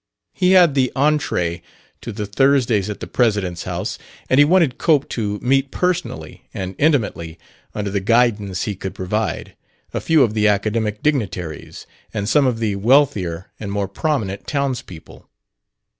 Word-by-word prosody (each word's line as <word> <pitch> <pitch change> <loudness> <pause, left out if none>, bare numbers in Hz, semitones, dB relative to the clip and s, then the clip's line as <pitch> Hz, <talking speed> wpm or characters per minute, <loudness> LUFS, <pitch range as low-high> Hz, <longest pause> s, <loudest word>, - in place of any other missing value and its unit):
He 185 -1 +3
had 175 -5 +6
the 130 -2 +1
entrée 130 - 0 0.4
to 115 - -6
the 105 0 -4
Thursdays 115 -2 +2
at 105 - -6
the - - -4
president's 100 -8 0
house, 90 +4 -4 0.3
and 130 - +5
he - - +9
wanted 160 -4 +3
Cope 150 -4 +2
to 105 -3 -2
meet 135 +2 +2
personally 180 +1 -3
and 95 -1 -4
intimately, 105 - 0 0.4
under 105 -2 -3
the 100 - 0
guidance 105 -2 +1
he 105 - -3
could 95 0 -6
provide, 105 +4 -3 0.4
a - - -2
few 160 -4 +4
of 110 -4 0
the 110 -1 +2
academic 105 +1 0
dignitaries 95 - -3 0.3
and 100 -1 -2
some 135 +5 +3
of 125 -3 0
the 110 -3 -1
wealthier 100 - +2
and 100 -2 -5
more 100 -1 -1
prominent 100 -4 -2
townspeople. 130 - -4
110 Hz, 155 wpm, -20 LUFS, 100-140 Hz, 0.4 s, he